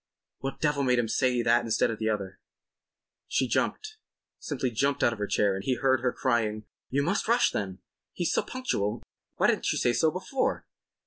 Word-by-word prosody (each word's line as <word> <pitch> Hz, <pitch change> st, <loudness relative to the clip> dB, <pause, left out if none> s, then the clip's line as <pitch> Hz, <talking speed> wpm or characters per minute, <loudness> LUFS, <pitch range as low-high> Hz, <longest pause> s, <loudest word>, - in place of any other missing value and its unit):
What 135 Hz, 0 st, -5 dB
devil 150 Hz, -2 st, +1 dB
made 125 Hz, -2 st, +2 dB
him 120 Hz, -1 st, +1 dB
say 125 Hz, +1 st, +1 dB
that 120 Hz, +1 st, +3 dB
instead 115 Hz, 0 st, +1 dB
of 110 Hz, -, -6 dB
the 110 Hz, 0 st, 0 dB
other? 100 Hz, -3 st, -3 dB, 0.9 s
She -, -, +1 dB
jumped—simply 430 Hz, -, -3 dB
jumped 140 Hz, +5 st, 0 dB
out 120 Hz, -, +4 dB
of 115 Hz, -, -10 dB
her 105 Hz, -, -1 dB
chair, 100 Hz, -1 st, +2 dB
and 95 Hz, 0 st, -4 dB
he 130 Hz, +4 st, +1 dB
heard 130 Hz, 0 st, +2 dB
her 125 Hz, 0 st, +1 dB
crying: 110 Hz, -5 st, 0 dB, 0.3 s
"You 140 Hz, +2 st, +1 dB
must 195 Hz, +9 st, 0 dB
rush, 235 Hz, +2 st, +4 dB
then. 95 Hz, -2 st, -4 dB, 0.3 s
He's 175 Hz, -, -1 dB
so -, -, +3 dB
punctual. 115 Hz, -, -2 dB, 0.3 s
Why -, -, +1 dB
didn't -, -, +2 dB
you -, -, -1 dB
say 120 Hz, -, +2 dB
so 160 Hz, +5 st, +3 dB
before?" 190 Hz, -, -2 dB
125 Hz, 190 wpm, -28 LUFS, 110-145 Hz, 0.9 s, out